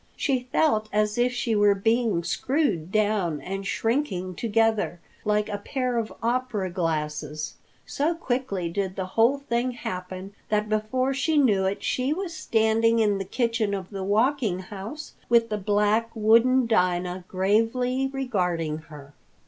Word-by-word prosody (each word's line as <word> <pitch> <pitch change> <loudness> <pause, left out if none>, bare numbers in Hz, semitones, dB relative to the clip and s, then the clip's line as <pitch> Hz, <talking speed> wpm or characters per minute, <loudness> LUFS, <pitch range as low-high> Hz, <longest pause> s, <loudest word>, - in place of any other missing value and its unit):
She 255 -3 -1
felt 220 -9 +2
as 210 0 +1
if 245 +1 +3
she 245 -2 -1
were 205 -1 +4
being 225 -3 +1
screwed 210 - 0
down 205 -7 +1
and 195 +3 -5
shrinking 225 -6 -1
together 225 -3 +1 0.3
like 210 0 +1
a 205 - -4
pair 250 +2 -1
of 220 - -4
opera 235 -6 -1
glasses. 155 -3 -2 0.3
So 310 +4 0
quickly 245 - -2
did 190 +2 -2
the 190 - -3
whole 235 +5 +4
thing 250 -2 -1
happen 185 -3 -6 0.2
that 210 0 +1
before 220 +5 0
she 290 +3 +1
knew 210 -9 +4
it, 195 +1 -2
she 260 +3 0
was 360 0 -4
standing 225 -5 +2
in 210 -3 +2
the 195 - -3
kitchen 230 -1 0
of 190 0 -7
the 195 -1 -4
Walking 220 0 +1
House 205 - -8 0.2
with 230 -1 +4
the 210 - -1
black, 210 +3 +2
wooden 230 +4 +4
Dinah 180 -4 0
gravely 230 +7 +1
regarding 180 - -1
her. 145 -2 -13
215 Hz, 150 wpm, -25 LUFS, 190-245 Hz, 0.3 s, were